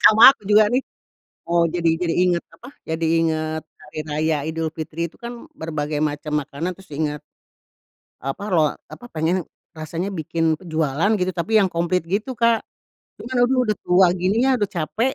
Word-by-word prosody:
Sama 225 +5 +10
aku 240 - -26
juga 210 0 +6
nih. 260 +2 +2 0.6
Eee, 170 0 +3
jadi 170 -2 +2
jadi 165 -1 0
inget, 175 -1 +1
apa, 245 - -13 0.2
jadi 160 0 -1
inget 160 -1 -1 0.2
hari 155 +1 -10
raya 155 +1 +1
Idulfitri. 160 0 -4
Itu - - -22
kan 235 +4 -8
berbagai 155 - -3
macam 150 0 -2
makanan 160 +6 -4
terus 190 -3 -18
ingat 150 0 -2 1.0
apa 135 +9 -4
loa 155 -3 +3 0.2
apa 245 - -11
pengennya, 165 +3 0 0.3
rasanya 165 +4 -4
bikin 165 -1 0
pe - - -16
jualan 160 +4 +1
gitu, 185 0 0
tapi 215 +6 +1
yang 195 -3 +4
komplit 175 +1 0
gitu 215 +8 -2
Kak. 230 -1 +4 0.6
Cuma 245 - -9
aduh 255 +1 +3
udah 215 - +1
tua 180 +1 +5
gini 185 +4 +1
ya - - +3
udah 205 - 0
capek, 220 +10 0
170 Hz, 170 wpm, -22 LUFS, 155-205 Hz, 1.0 s, Sama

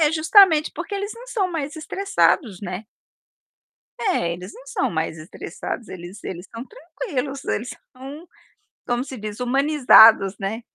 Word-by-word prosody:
É, 300 -2 +4
justamente 320 0 +5
porque 410 - -5
eles 400 +1 -3
não 480 +2 -12
são 400 -7 -1
mais 310 -2 -4
estressados, 315 - 0
né. 185 +2 -5 1.2
É, 265 - 0
eles 180 +3 -9
não - - -14
são - - -1
mais 160 -1 -2
estressados, 175 +7 -7
eles 185 +3 -10
eles 175 0 -7
estão 230 +4 -9
tranquilos 285 - -6
eles 240 +4 -2 0.3
são, 280 +6 -10 0.6
como 240 +1 0
se 265 -2 -9
diz, 210 +1 -7
humanizados, 250 -6 +5
né. 210 +4 -4
260 Hz, 145 wpm, -22 LUFS, 200-320 Hz, 1.2 s, justamente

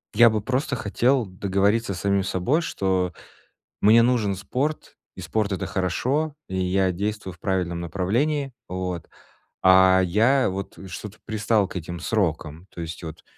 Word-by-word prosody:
я 120 +2 +8
бы 110 -1 -1
просто 130 +4 -1
хотел 120 +3 +1
договориться 100 +3 0
с 90 - -6
самим 100 -1 +1
собой, 95 - 0
что 95 - -1 0.7
мне 110 +3 +6
нужен 115 -5 +2
спорт, 135 +11 -3 0.2
и - - -7
спорт- 110 -2 -1
это 95 - -2
хорошо, 130 - -1
и 95 - -4
я 95 0 +1
действую 100 +1 -3
в 85 - -24
правильном 90 -3 -1
направлении, 120 - -1 0.2
вот. 90 -2 -4 0.5
А 95 0 +6
я 115 +8 +3
вот 95 +1 -6
что-то 100 +3 -8
пристал 110 -2 +1
к - - -9
этим 85 0 -5
срокам, 85 -4 -2
то - - -7
есть 80 0 -6
вот 80 -2 -9
100 Hz, 150 wpm, -24 LUFS, 90-115 Hz, 0.7 s, я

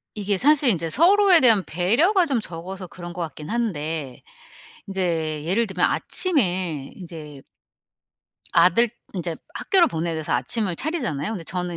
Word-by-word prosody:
이게 205 -2 0
사실 285 +2 +4
인제 165 -5 +1
서로에 375 +2 +5
대한 225 -6 +5
배려가 285 - +2
좀 265 -6 0
적어서 185 0 -7
그런 175 0 -9
것 175 - -6
같긴 155 -1 -8
한데. 160 - -3 0.7
인제 165 -6 -2
예를 205 +7 +1
들면 190 -3 +1
아침에 185 - -1
인제 155 -6 -10 1.1
아들 230 +7 +5 0.3
인제 170 -3 -3 0.2
학교를 375 -4 +3
보내야 165 +1 -3
돼서 155 -1 -3
아침을 175 - -1
차리잖아요. 240 - -2
근데 190 -7 -5
저는 180 -1 -4
185 Hz, 305 characters per minute, -23 LUFS, 165-235 Hz, 1.1 s, 서로에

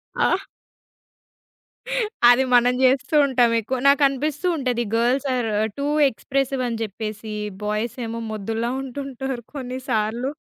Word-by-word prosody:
ఆ! - - +2 2.0
అది 250 +2 +5
మనం 245 0 +5
జేస్తూ 265 +3 +2
ఉంటాం 245 -3 +3
ఎక్కువ. 255 +4 -3
నాకు 280 +1 +5
అనిపిస్తూ 295 +5 -2
ఉంటది 250 -3 0
గర్ల్స్ 250 +4 +1
ఆర్ 240 -3 -1 0.3
టూ 280 - -1 0.2
ఎక్స్‌ప్రెసివ్ 270 +2 -2
అని 230 -1 -3
జెప్పేసి, 215 0 -5 0.3
బాయ్స్ 215 +3 -2
ఏమో 230 +1 -4
మొద్దుల్లా 225 +2 -2
ఉంటుంటారు 265 -1 -5
కొన్ని 255 -2 -5
సార్లు. 230 +3 0
245 Hz, 120 wpm, -22 LUFS, 225-270 Hz, 2.0 s, అది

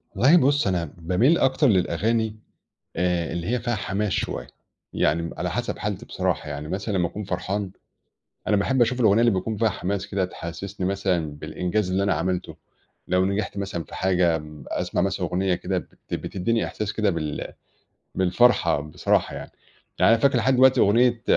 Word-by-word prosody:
والله 145 +8 +6
بُص 140 - +3
أنا 85 -5 -1
باميل 95 - +3
أكتر 135 +3 +3
للأغاني 110 +3 +1 0.6
آآ 90 -1 0
اللي 85 0 -4
هي 120 +2 0
فيها 120 +1 -1
حماس 100 0 -2
شوية. - - -2 0.5
يعني 80 +3 +1
م 85 - -4
على - - -2
حسب - - -3
حالتي - - -4
بصراحة، - - -2
يعني 75 +1 -5
مثلًا 100 +4 -3
لمّا 90 - +2
أكون 105 +4 -6
فرحان، 95 +1 -3 0.8
أنا 105 - +3
باحب 125 +6 +2
أشوف 125 +2 +1
الأغنية 110 -2 +5
اللي 120 0 +5
بيكون 100 +4 -2
فيها 115 +2 +2
حماس 100 0 -3
كده 95 -2 -1
تحسّسني 90 +1 -5
مثلًا 90 -5 -1
بالإنجاز 90 +2 -2
اللي 95 +2 +1
أنا 100 -1 +2
عملته، 90 +3 -2 0.5
لو 90 +1 +3
نجحت 100 +1 -2
مثلًا 100 -4 -3
في - - -12
حاجة 90 -3 +2
م 75 -2 -11
أسمع - - -2
مثلًا 95 -1 -1
أغنية 90 +2 0
كده 90 +1 -2
بت - - -9
بتدّيني 115 +5 -1
إحساس 105 -1 -4
كده 105 -1 +1
بال 75 -4 -4 0.6
بالفرحة 95 -2 +3
بصراحة 75 +1 0
يعني. - - -8 0.5
يعني - - +5
أنا 115 - -1
فاكر 135 -3 +4
لحد 130 +4 +2
دلوقتي 130 +1 +5
أغنية 120 +3 +3
95 Hz, 175 wpm, -24 LUFS, 90-110 Hz, 0.8 s, والله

